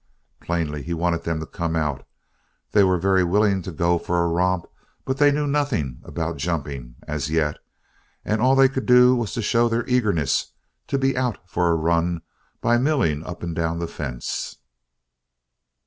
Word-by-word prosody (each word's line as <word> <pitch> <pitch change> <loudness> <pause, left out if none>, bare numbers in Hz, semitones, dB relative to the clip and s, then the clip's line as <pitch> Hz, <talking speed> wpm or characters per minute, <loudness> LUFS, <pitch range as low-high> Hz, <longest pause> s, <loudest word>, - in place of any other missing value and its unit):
Plainly 80 -4 -2
he 85 +4 -3
wanted 85 0 -1
them 85 -1 -1
to - - -4
come 85 +1 -3
out. 75 -4 -2 0.6
They 105 - +5
were 95 -1 +3
very 95 +1 +3
willing 100 +2 +2
to 90 - -6
go 85 +1 +1
for 85 0 0
a - - +1
romp 90 +1 +1 0.4
but 130 0 -1
they 145 0 +6
knew 145 +1 0
nothing 135 - -1
about 85 0 -4
jumping, 70 -8 -4
as 75 -1 -3
yet, 75 -2 0 0.7
and 110 0 0
all 130 +2 +4
they 135 0 +6
could 130 0 -4
do 125 0 +7
was 120 -4 -2
to 115 - -2
show 115 +2 +2
their 115 +1 -1
eagerness 100 - +1 0.3
to - - 0
be 135 -1 +1
out 125 -8 -2
for 90 -1 +1
a 85 - +3
run 85 +1 0 0.4
by 120 +1 +3
milling 125 - +1
up 85 0 -8
and 85 -1 -3
down 85 0 -1
the 85 - -2
fence. 65 -7 -5
85 Hz, 180 wpm, -23 LUFS, 80-120 Hz, 0.7 s, do